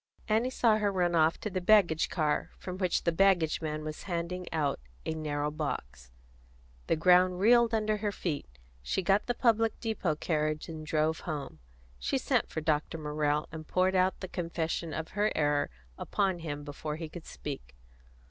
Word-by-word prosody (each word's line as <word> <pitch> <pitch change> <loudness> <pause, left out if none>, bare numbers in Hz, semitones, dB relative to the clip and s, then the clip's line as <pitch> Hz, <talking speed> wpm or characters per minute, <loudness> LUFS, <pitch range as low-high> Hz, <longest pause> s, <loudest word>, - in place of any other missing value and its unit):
Annie 225 +4 +2
saw 230 -4 +3
her 205 -1 +1
run 175 -2 +1
off 160 0 +3
to 210 - -2
the 185 0 -2
baggage 175 -5 +4
car, 155 -4 0
from 185 0 -6
which 185 -3 +1
the 170 - +2
baggage 175 -3 +3
man 155 -1 -3
was 155 0 -5
handing 175 +1 -3
out 150 -3 0 0.3
a - - -1
narrow 150 -1 -2
box. 65 - -5 0.8
The - - +3
ground 180 +2 +4
reeled 235 +3 +5
under 215 -1 +1
her 210 0 -1
feet; 155 - -3 0.3
she 60 - -1
got 195 +3 +2
the 245 - 0
public 225 -2 +2
depot 215 -8 -1
carriage 155 -1 -1
and 160 -2 -7
drove 155 +1 +1
home. 145 - -5 0.4
She 60 - 0
sent - - +1
for 160 - -3
Dr. 155 +1 0
Morrell, 150 -1 0
and 155 -1 -8
poured 185 +1 +2
out 185 0 +2
the 185 - -4
confession 170 -2 -3
of 160 +1 -4
her 210 +2 +1
error 145 -1 +2 0.3
upon 190 -4 0
him 145 -3 -5
before 150 +1 -5
he 160 +1 -5
could 165 +1 -10
speak. - - -7
165 Hz, 175 wpm, -30 LUFS, 155-190 Hz, 0.8 s, reeled